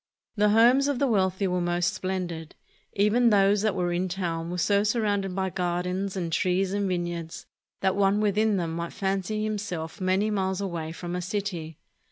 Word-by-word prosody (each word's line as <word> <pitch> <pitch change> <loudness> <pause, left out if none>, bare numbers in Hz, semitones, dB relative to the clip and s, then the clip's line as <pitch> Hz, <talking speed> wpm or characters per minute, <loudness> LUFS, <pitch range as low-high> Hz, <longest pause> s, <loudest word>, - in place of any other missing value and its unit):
The 210 -1 +3
homes 240 +6 +5
of 285 -2 0
the 280 - +2
wealthy 195 -5 +1
were 180 -1 0
most 175 0 0
splendid. 175 -4 -4 0.4
Even 215 +4 +3
those 200 -1 +4
that 215 -2 +1
were 175 -2 0
in 180 +2 -1
town 170 -3 -3
were 180 - -3
so 200 +3 +2
surrounded 205 -4 0
by 190 -1 -1
gardens 180 +2 -2
and 170 -3 -3
trees 185 +2 +1
and 200 -1 0
vineyards 175 -2 -4 0.4
that 190 -1 +2
one 200 +1 +3
within 210 0 +2
them 165 -3 -2
might 170 0 -4
fancy 195 +2 -1
himself 200 -5 -4
many 190 +3 +1
miles 190 -2 -1
away 170 -5 -3
from 175 +1 -5
a 180 - -2
city. 180 -5 -4
190 Hz, 180 wpm, -26 LUFS, 175-205 Hz, 0.4 s, homes